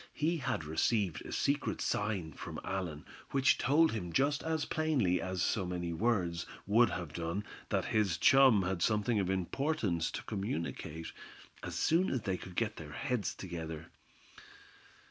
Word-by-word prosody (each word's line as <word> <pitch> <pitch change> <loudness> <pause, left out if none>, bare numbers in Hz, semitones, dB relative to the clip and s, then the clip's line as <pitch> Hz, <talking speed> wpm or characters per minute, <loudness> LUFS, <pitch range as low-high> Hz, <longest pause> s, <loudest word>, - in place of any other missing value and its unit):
He 165 +3 +1
had 130 - -2
received 80 +2 0
a - - -7
secret 140 +1 0
sign 100 -7 -1
from - - -7
Allan, 90 -6 -4 0.2
which 135 -1 +3
told 160 +4 +4
him 90 -6 -4
just 145 - +2
as 160 -1 -1
plainly 135 - +1
as 95 -1 -2
so 105 - +1
many 90 -1 -3
words 90 -4 0 0.2
would 115 +4 +5
have 85 -4 -5
done 85 +4 -2 0.3
that - - 0
his 105 -6 +2
chum 130 0 +6
had 90 -1 -2
something 105 +3 +2
of 95 -2 0
importance 95 - 0
to - - -5
communicate, 85 -5 -4 0.5
as - - -5
soon 175 +4 +3
as 130 - -1
they 95 -3 -1
could 90 0 -10
get 115 +1 -1
their 75 -2 -8
heads 125 - -2
together. 80 -3 -6
95 Hz, 155 wpm, -33 LUFS, 85-125 Hz, 0.5 s, chum